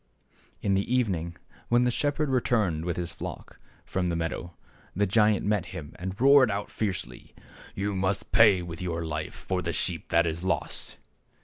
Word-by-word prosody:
In 100 - +2
the 100 +4 0
evening 90 -10 0 0.3
when 120 +1 +4
the 125 - +2
shepherd 145 +4 0
returned 110 - +1
with 85 - -2
his 85 -1 -3
flock - - -8 0.3
from 90 -1 -1
the 85 - 0
meadow, 85 +1 -4 0.4
the 105 +3 +2
giant 105 +1 +3
met 100 -4 +1
him 75 -2 -8
and 95 +2 -5
roared 135 -1 +7
out 100 0 -3
fiercely, 95 - -4 0.2
" - - -18
You 100 +1 -1
must 95 +1 -1
pay 105 -6 +6
with 85 0 -7
your 85 -2 -2
life 75 0 -4
for 95 -1 -2
the 85 -1 -2
sheep 85 -3 -2
that 85 0 +4
is 80 +1 -3
lost 95 - -2
95 Hz, 180 wpm, -27 LUFS, 85-110 Hz, 0.4 s, roared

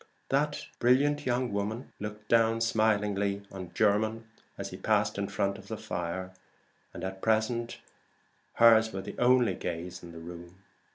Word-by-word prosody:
That 145 +2 0
brilliant 145 +4 +3
young 125 -2 0
woman 105 +5 -3
looked 105 0 -7 0.3
smilingly 105 -3 +1
down 100 0 -13
on 95 -2 -7
Mr. - - -25
Jermyn 110 +2 +2 0.3
as - - -5
he - - -7
passed 105 -1 +1
in 100 - -1
front 100 0 -1
of - - -14
the - - -4
fire; 90 +2 -4 0.6
and - - -8
at 95 0 -5
present 115 +2 0 0.8
hers 115 -1 +6
was 95 0 -5
the - - -7
only 120 -4 +4
gaze 85 0 -5
in 85 - -10
the 85 - -11
room. 85 +3 -10
105 Hz, 160 wpm, -29 LUFS, 95-115 Hz, 0.8 s, hers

